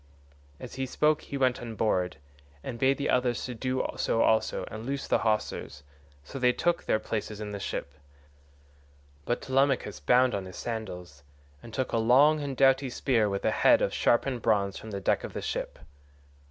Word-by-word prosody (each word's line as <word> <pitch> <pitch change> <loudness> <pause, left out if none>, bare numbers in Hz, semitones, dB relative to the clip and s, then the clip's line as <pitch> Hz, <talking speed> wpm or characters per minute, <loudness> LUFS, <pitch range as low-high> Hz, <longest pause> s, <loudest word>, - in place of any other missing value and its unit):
As - - -9
he 130 - -1
spoke 150 +3 +2
he 140 - -6
went 130 -2 +1
on 115 -2 -6
board, 90 -5 0 0.5
and 115 - -6
bade 135 +2 +3
the 140 - -2
others 125 -1 +1
do 130 +1 -2
so 115 - +1
also 110 0 +1
and 110 0 -7
loose 135 +3 -4
the - - +2
hawsers, 105 -9 -2 0.4
so 135 - -8
they 125 -1 +4
took 175 +5 0
their - - +2
places 110 -1 -4
in 105 -1 -5
the 100 - -5
ship. 70 -6 -5 1.3
But 120 - -2
Telemachus 135 0 +1
bound 125 0 +3
on 100 -1 -3
his 95 - -10
sandals, 90 -10 -6 0.4
and 115 - -11
took 130 +3 -2
a - - +1
long 140 +7 +5
and 140 -3 -4
doughty 135 0 +4
spear 120 -4 +1
with 100 0 -3
a - - +3
head - - +5
of - - 0
sharpened 125 0 +1
bronze 100 -3 +1
from 110 - -8
the 100 -2 -4
deck 95 - 0
of - - -7
the - - -4
ship. - - -4
120 Hz, 185 wpm, -28 LUFS, 105-135 Hz, 1.3 s, long